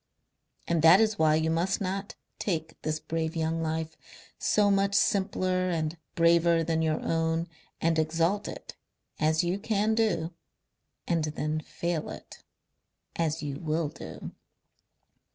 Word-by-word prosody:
"And 170 -2 +1
that 165 +4 +8
is 220 -3 +2
why 155 -1 +4
you 160 +1 +1
must 175 +4 +1
not 195 +1 -3 0.2
take 160 -5 -3
this 155 0 -2
brave 160 0 -3
young 165 0 -1
life, 160 0 -2 0.4
so 205 -1 +3
much 200 0 +2
simpler 185 -2 +1
and 160 -2 -1 0.2
braver 170 0 +4
than 160 0 0
your 155 -1 +1
own, 165 +1 0 0.3
and 165 0 +2
exalt 165 +6 +1
it - - -8 0.4
as 155 +1 +2
you 175 +3 -1
can 215 0 +1
do 180 -7 0 0.7
and 165 -2 +1
then 155 0 -2
fail 170 0 -3
it, - - -10 0.7
as 160 -1 -1
you 140 -1 -4
will 155 -1 -1
do...." - - -9
165 Hz, 135 wpm, -28 LUFS, 160-185 Hz, 0.7 s, that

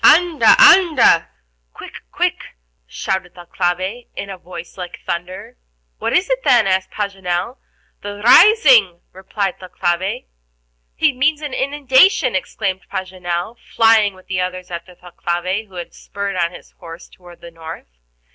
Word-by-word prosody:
"Anda, 340 -1 +5
anda!" 310 - +5 0.5
(quick, - - -10
quick), - - -1 0.4
shouted 185 - -4
Thalcave, 180 +5 -3
in 200 0 -6
a 190 - -8
voice 175 -1 -10
like 180 -2 -8
thunder. 180 - -6 0.4
"What - - -2
is 370 - +2
it, - - -1
then?" 240 -3 +4
asked 190 -1 0
Paganel. 195 +2 -4 0.4
"The 205 0 -7
rising," 250 - +6
replied 190 +1 -4
Thalcave. 180 - -3 0.7
"He 310 -3 +2
means 290 +4 0
an 290 -3 -5
inundation," 275 - +2
exclaimed 190 0 -3
Paganel, 185 +2 -5 0.2
flying 220 -3 +4
with 185 - -18
the 185 -1 -2
others 180 0 -5
after 175 +1 -8
Thalcave, 180 +4 -4
who 190 - -18
had 175 -1 -8
spurred 200 -1 -6
on 170 -2 0
his - - -14
horse 165 0 -11
toward 175 -1 -17
the 170 - -11
north. 160 - -11
190 Hz, 135 wpm, -18 LUFS, 175-235 Hz, 0.7 s, rising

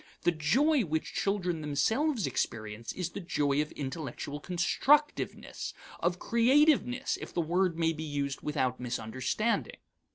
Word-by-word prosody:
The 175 - +4
joy 250 - +3
which 160 -3 -2
children 180 -5 0
themselves 220 - +1
experience 110 -3 -3
is 180 -2 -4
the - - -5
joy 145 -5 +1
of 150 - -4
intellectual 145 0 -5
constructiveness 265 - +1 0.2
of 175 +1 0
creativeness, 260 - +3
if - - -7
the - - +1
word 175 +1 +1
may 165 -1 +2
be 155 - -7
used 145 -3 -3
without 130 -4 -1
misunderstanding. 125 - -1
165 Hz, 130 wpm, -30 LUFS, 140-215 Hz, 0.2 s, The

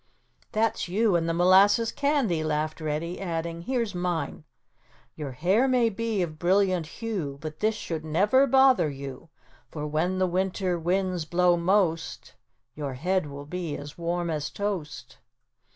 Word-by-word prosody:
"That's 220 -3 0
you 205 +2 +2
and 165 -1 +1
the - - +1
molasses 195 +6 +5
candy," 275 - +1
laughed 155 +1 -2
Reddy, 155 +4 -3
adding, 170 -2 -3
"Here's 230 +1 -1
mine: 175 -4 -3 0.7
"Your 145 -4 -6
hair 190 - +2
may 250 -3 +3
be 225 -2 -1
of 155 -2 -6
brilliant 185 -2 +2
hue, 180 -9 -4
But 155 +1 -7
this 215 +1 +1
should 165 -6 -5
never 205 - +3
bother 265 - +5
you; 140 +1 -8 0.4
For 150 +2 -5
when 160 +5 0
the 185 - +2
winter 185 0 -1
winds 180 0 0
blow 175 +1 +3
most, 170 -2 0 0.4
Your 140 -3 -5
head 180 +4 0
will 140 0 -8
be 170 -1 -4
as 145 +1 -9
warm 170 0 -2
as 150 -2 -2
toast." 195 -8 -5
175 Hz, 150 wpm, -26 LUFS, 155-200 Hz, 0.7 s, molasses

